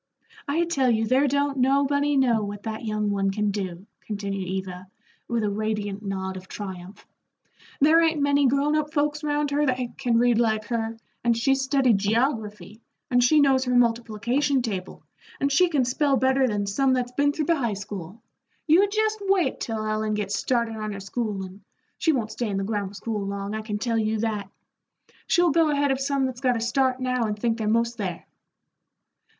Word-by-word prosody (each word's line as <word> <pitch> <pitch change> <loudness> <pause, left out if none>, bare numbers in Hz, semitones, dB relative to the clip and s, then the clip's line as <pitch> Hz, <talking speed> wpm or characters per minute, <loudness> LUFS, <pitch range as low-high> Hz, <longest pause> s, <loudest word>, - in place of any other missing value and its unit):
"I 320 +4 +1
tell 275 -7 +1
you 225 -1 +2
there 260 +5 +3
don't 280 0 0
nobody 280 +2 +2
know 240 -5 +3
what 205 0 -6
that 220 0 -5
young 215 -2 -1
one 195 -1 0
can 210 +1 0
do," 190 -2 -5 0.2
continued 200 -3 -4
Eva, 185 0 -5 0.4
with 235 -2 -1
a 210 - +1
radiant 210 -1 -3
nod 190 -1 -4
of 185 0 -11
triumph. 190 -1 -8 0.7
"There 315 +4 +5
ain't 325 -2 +2
many 285 -1 +3
grown 280 +3 +2
up 305 -1 -1
folks 295 0 0
round 295 -1 0
here 290 +1 +1
that 255 -3 +1 0.2
can 245 -4 +1
read 240 -1 +3
like 220 -2 +1
her, 225 -1 -2 0.3
and 235 -1 +2
she's 270 +3 +2
studied 265 -6 +2
geography, 215 -2 -1 0.3
and 245 0 +4
she 300 +5 +5
knows 265 -2 +3
her 250 0 0
multiplication 240 +3 +1
table, 195 -6 -5 0.4
and 280 0 +1
she 355 +6 +4
can 285 -6 +1
spell 270 +2 +1
better 265 0 +3
than 205 -3 -1
some 260 +7 +1
that's 250 -1 -1
been 285 +3 +2
through 305 +1 -2
the 335 - +3
high 235 -8 -1
school. 200 +1 -8 0.4
You 360 +6 +5
jest 435 +1 0
wait 385 -8 +1
till 220 -2 -3
Ellen 215 0 -1
gets 205 -1 -2
started 235 -2 -1
on 215 -1 -4
her 200 - -6
schoolin' 195 -2 -4 0.4
she 325 - +3
won't 230 -7 -1
stay 235 -1 -3
in 195 - -2
the 195 - -1
grammar 205 -1 -3
school 210 0 -3
long, 200 +1 -4
I 220 - -3
can 215 -1 -4
tell 230 +1 0
you 220 0 0
that. 210 -4 -2 0.8
She'll 350 -1 +3
go 325 +1 +3
ahead 285 -1 +1
of 270 0 -1
some 275 0 0
that's 255 -1 -5
got 250 -3 +2
a - - -2
start 255 +2 +1
now 250 -2 0
and 210 -1 -2
think 230 +1 -1
they're 215 - -1
'most 230 +2 +1
there." 185 -4 -4
235 Hz, 195 wpm, -25 LUFS, 210-275 Hz, 0.8 s, There